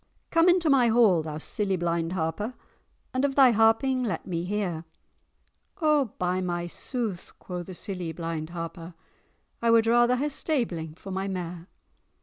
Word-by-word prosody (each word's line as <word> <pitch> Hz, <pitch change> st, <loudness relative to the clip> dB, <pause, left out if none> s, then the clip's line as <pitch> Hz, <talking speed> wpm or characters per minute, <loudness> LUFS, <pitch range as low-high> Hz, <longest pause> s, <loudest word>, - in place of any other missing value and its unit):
"'Come 330 Hz, +2 st, +5 dB
into 350 Hz, -2 st, +3 dB
my 270 Hz, -5 st, +5 dB
hall, 220 Hz, -7 st, +5 dB
thou 155 Hz, -1 st, -5 dB
silly 195 Hz, +5 st, -1 dB
blind 170 Hz, -1 st, -1 dB
Harper, 190 Hz, +8 st, -2 dB, 0.6 s
And 255 Hz, +1 st, 0 dB
of 275 Hz, -1 st, +1 dB
thy 265 Hz, -3 st, +7 dB
harping 225 Hz, +4 st, +3 dB
let 215 Hz, -6 st, -3 dB
me 170 Hz, -2 st, -3 dB
hear!' 185 Hz, -5 st, -2 dB, 1.0 s
'O, 305 Hz, -4 st, +3 dB
by 180 Hz, +1 st, 0 dB
my 175 Hz, -1 st, -2 dB
sooth,' 215 Hz, +1 st, -4 dB
quo' 180 Hz, -1 st, -6 dB
the 180 Hz, +1 st, -9 dB
silly 180 Hz, -3 st, -5 dB
blind 165 Hz, -1 st, -4 dB
Harper, 170 Hz, 0 st, -7 dB, 0.7 s
'I 235 Hz, -, +2 dB
wad 230 Hz, -1 st, +5 dB
rather 240 Hz, +2 st, +4 dB
hae 285 Hz, +4 st, -1 dB
stabling 215 Hz, -, -2 dB
for 195 Hz, +3 st, -9 dB
my 190 Hz, +1 st, -2 dB
mare." 180 Hz, -2 st, -5 dB
190 Hz, 155 wpm, -27 LUFS, 170-245 Hz, 1.0 s, thy